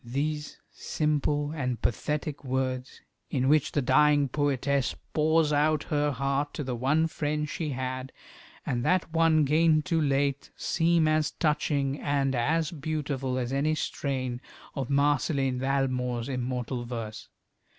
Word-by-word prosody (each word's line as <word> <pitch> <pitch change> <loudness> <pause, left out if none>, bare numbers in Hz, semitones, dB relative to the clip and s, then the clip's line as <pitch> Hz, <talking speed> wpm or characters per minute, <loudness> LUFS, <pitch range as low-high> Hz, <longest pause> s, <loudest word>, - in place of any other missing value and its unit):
These 145 +5 -3
simple 150 -1 -1
and 125 -6 -2
pathetic 150 +4 -2
words, 130 0 -2 0.3
in 130 -2 0
which 150 0 +3
the 145 - +1
dying 145 +2 +4
poetess 140 -1 0 0.2
pours 155 0 +3
out 150 +1 +2
her 150 0 +2
heart 140 +2 -1
to 150 - -3
the 130 -2 -3
one 140 +7 +2
friend 150 -1 -2
she 155 +1 -3
had, 130 0 -4 0.5
and 120 -1 -1
that 180 0 +1
one 165 -2 +4
gained 155 +1 +3
too 165 -3 +1
late, 140 -1 0
seem 165 -1 +2
as 155 0 +2
touching 145 -3 0
and 140 -2 0
as 155 +6 +1
beautiful 145 -4 -3
as 125 0 -2
any 150 +3 +1
strain 130 -4 -3 0.3
of 135 -4 -4
Marceline 140 -2 +1
Valmore's 130 -2 -1
immortal 125 -1 -3
verse. 115 -3 -6
140 Hz, 135 wpm, -28 LUFS, 130-150 Hz, 0.5 s, dying